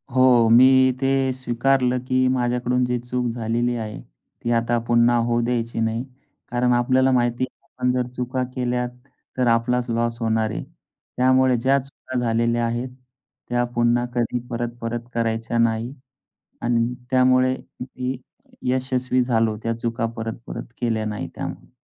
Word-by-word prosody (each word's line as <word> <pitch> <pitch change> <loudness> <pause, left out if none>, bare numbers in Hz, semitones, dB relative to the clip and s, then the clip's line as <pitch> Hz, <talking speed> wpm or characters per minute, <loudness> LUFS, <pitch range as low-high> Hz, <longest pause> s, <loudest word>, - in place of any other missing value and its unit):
हो, 125 -3 +5
मी 130 +2 +6
ते 135 - +2 0.3
स्वीकारलं 125 0 +1
की 130 0 +2
माझ्याकडून 125 0 0
जी 125 0 0
चूक 125 +1 -3
झालेली 120 +1 -1
आहे. 110 -2 -5 0.4
ती 120 - 0
आता 115 0 +2
पुन्हा 120 0 +4
होऊ 120 0 +1
द्यायची 115 -1 -2
नाही. 115 +1 0 0.5
कारण 125 0 +2
आपल्याला 130 +2 +3
माहिती 120 0 +1
आहे - - -42
आपण 125 0 -1
जर 125 -1 0
चुका 125 +1 -2
केल्या 125 -1 -1 0.5
तर 125 -1 +2
आपलाच 125 +1 0
लॉस 115 0 -1
होणार 110 -1 +1
आहे. - - -4 0.5
त्यामुळे 130 0 +4
ज्या 135 +4 +3
चुका 130 -2 -6
झालेल्या 115 0 +1
आहेत, 120 +2 -2 0.6
त्या 120 0 +1
पुन्हा 120 +1 +2
कधी 120 0 0
परत-परत 120 0 -4
करायच्या 115 0 -1
नाही 115 +2 +1 0.7
अन् 120 0 +1 0.2
त्यामुळे 130 0 +4 0.3
मी 125 0 -4 0.5
यशस्वी 130 0 +1
झालो 115 -3 +1
त्या 115 0 -1
चुका 115 0 -1
परत-परत 115 +1 -6
केल्या 115 -2 0
नाही 105 -5 -4
त्यामुळे. - - -7
120 Hz, 140 wpm, -23 LUFS, 115-125 Hz, 0.7 s, मी